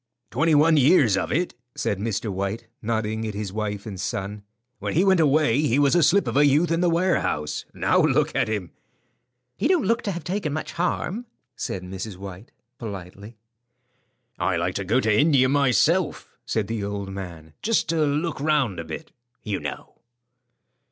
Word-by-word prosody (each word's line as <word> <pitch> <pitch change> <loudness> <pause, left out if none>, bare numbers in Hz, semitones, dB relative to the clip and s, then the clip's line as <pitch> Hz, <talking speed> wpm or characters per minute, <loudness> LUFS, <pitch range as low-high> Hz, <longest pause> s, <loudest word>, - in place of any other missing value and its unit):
"Twenty 165 0 +3
one 155 +2 +5
years 140 - +5
of - - -2
it," 175 +5 0 0.2
said 100 - -1
Mr. 105 0 -2
White, 100 +4 -3 0.2
nodding 110 0 -2
at 105 - -5
his 100 -2 -4
wife 105 -2 -3
and 100 -4 -6
son. 105 -1 -4 0.4
"When - - -3
he 175 - +4
went 190 -2 +4
away 145 -4 +3
he 140 -4 +2
was 145 -1 +4
a 175 - +4
slip 195 +6 +4
of 115 - -2
a 145 - +5
youth 150 +4 +3
in 165 +1 +1
the 175 - +3
warehouse. 170 - 0
Now - - +2
look - - +2
at - - +2
him." 105 -5 -3 0.8
"He - - 0
don't 350 - +2
look 230 +3 +2
to 200 - -2
have 175 -3 -5
taken 175 -2 -2
much 155 - -4
harm," 180 +6 -2 0.3
said 95 - -4
Mrs. 95 +2 -6
White, 95 +2 -9 0.3
politely. 100 0 -8 1.0
"I'd 90 -1 +1
like 90 +2 -1
to 95 - -3
go 110 +7 +2
to 110 -3 +2
India 140 -4 +5
myself," 145 +5 +2 0.2
said 110 -2 0
the 110 0 -3
old 100 -1 -4
man, 85 -5 -8
"just 230 0 +1
to 160 -1 +2
look 150 +2 -1
round 140 - +1
a - - -3
bit, 160 - -8 0.3
you 105 -3 -2
know." - - -7
120 Hz, 180 wpm, -24 LUFS, 100-160 Hz, 1.0 s, one